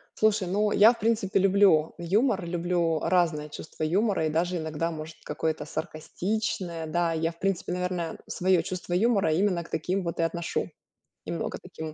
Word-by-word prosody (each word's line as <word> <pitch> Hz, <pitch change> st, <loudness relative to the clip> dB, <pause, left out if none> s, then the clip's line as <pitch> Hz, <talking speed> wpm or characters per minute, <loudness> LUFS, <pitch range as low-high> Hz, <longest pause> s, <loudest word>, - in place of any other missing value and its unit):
Слушай, 215 Hz, -3 st, +2 dB
ну, 205 Hz, +3 st, +1 dB
я 220 Hz, +4 st, +7 dB
в -, -, -14 dB
принципе 210 Hz, -3 st, +1 dB
люблю 195 Hz, -5 st, +4 dB
юмор, 195 Hz, +3 st, +1 dB
люблю 170 Hz, -1 st, 0 dB
разное 160 Hz, -4 st, +1 dB
чувство 155 Hz, +1 st, -7 dB
юмора 190 Hz, 0 st, +1 dB
и -, -, -1 dB
даже 175 Hz, +3 st, 0 dB
иногда, 160 Hz, +1 st, -2 dB
может, 160 Hz, 0 st, -7 dB
какое-то 155 Hz, +1 st, -2 dB
саркастичное. 170 Hz, +2 st, -3 dB
Да, 170 Hz, +1 st, 0 dB
я 165 Hz, +1 st, 0 dB
в 170 Hz, -, -21 dB
принципе, 195 Hz, -2 st, -1 dB
наверное, 180 Hz, -2 st, -3 dB
своё 185 Hz, -1 st, +2 dB
чувство 180 Hz, -1 st, -5 dB
юмора 200 Hz, -4 st, +3 dB
именно 180 Hz, -1 st, +1 dB
к 165 Hz, -, -15 dB
таким 180 Hz, +4 st, -1 dB
вот 170 Hz, -1 st, -4 dB
и -, -, +3 dB
отношу. 165 Hz, +1 st, -2 dB, 0.6 s
Немного -, -, -3 dB
таким 160 Hz, -, -8 dB
вот. 155 Hz, -, -7 dB
175 Hz, 170 wpm, -27 LUFS, 160-195 Hz, 0.6 s, я